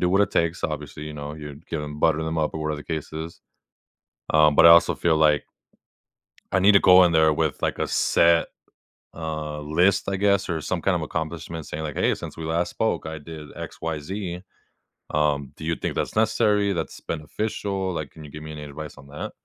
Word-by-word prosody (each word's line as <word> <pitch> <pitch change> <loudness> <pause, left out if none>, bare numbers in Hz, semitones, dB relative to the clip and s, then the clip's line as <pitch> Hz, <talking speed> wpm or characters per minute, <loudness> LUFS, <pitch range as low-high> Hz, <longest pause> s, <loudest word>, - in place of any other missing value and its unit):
do - - +1
what 95 - +4
it 100 - 0
takes." 85 +1 0
Obviously, 75 -1 -4
you 75 - -7
know, 75 0 -6
you'd 75 0 -10
give 80 - -3
them 75 0 -7
butter 80 0 +3
them 80 0 -2
up 75 0 0
or 80 - -4
whatever 75 0 -1
the - - -26
case 80 0 -6
is. 80 +2 -7 0.9
Um, 75 -1 +5
but 85 - +8
I - - +10
also 85 0 +7
feel 80 -2 +2
like 75 -2 +3 1.1
I 95 - +3
need 100 +2 +6
to 100 - +7
go 90 0 +7
in 85 - +4
there 80 -1 +5
with, 80 -1 -1
like, - - -1
a - - 0
set, 85 0 +3 0.7
uh, 75 -2 -4
list, 90 +7 +2
I 100 - 0
guess, 100 -1 +2
or 80 -2 -1
some - - -3
kind - - +2
of - - -3
accomplishment 80 0 -4
saying 80 +1 -5
like, 75 - -4
"Hey. - - +2
Since - - -8
we 80 - -6
last 85 +2 0
spoke, - - -1
I 80 0 -5
did 75 0 -10
X - - -8
Y 80 -2 -3
Z." 90 +2 -5 0.7
Um, 75 -3 0
do - - -11
you 80 +1 0
think - - -4
that's - - -2
necessary? 105 -2 +2
That's 85 - -4
beneficial? 95 +3 -3
Like, 75 -4 -5
can 80 -1 -12
you 70 - -12
give 75 0 -9
me 80 - -7
any 75 -1 -7
advice 75 +1 -8
on 70 - -14
that? 75 +1 -6
80 Hz, 220 wpm, -24 LUFS, 75-85 Hz, 1.1 s, I